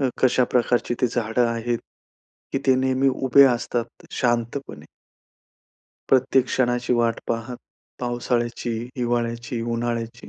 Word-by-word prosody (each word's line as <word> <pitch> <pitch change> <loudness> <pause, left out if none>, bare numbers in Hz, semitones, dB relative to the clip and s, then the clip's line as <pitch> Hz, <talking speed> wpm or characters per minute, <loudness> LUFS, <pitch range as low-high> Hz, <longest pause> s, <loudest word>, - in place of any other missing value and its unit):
अ, - - +1 0.2
कशा 130 -1 +4
प्रकारची 120 0 +1
ती 125 - +4
झाडं 120 0 0
आहेत, 115 0 -1 0.7
की 135 - +1
ते 130 - +6
नेहमी 130 +1 +2
उभे 135 +1 +5
असतात 120 -1 -4
शांतपणे. 120 +3 -2 1.2
प्रत्येक 130 0 +4
क्षणाची 125 -1 0
वाट 115 -1 +1
पाहत. 115 +2 -3 0.4
पावसाळ्याची, 120 -1 -2 0.3
हिवाळ्याची, 120 -1 -2
उन्हाळ्याची. 115 -1 -3
120 Hz, 110 wpm, -23 LUFS, 115-125 Hz, 1.2 s, ते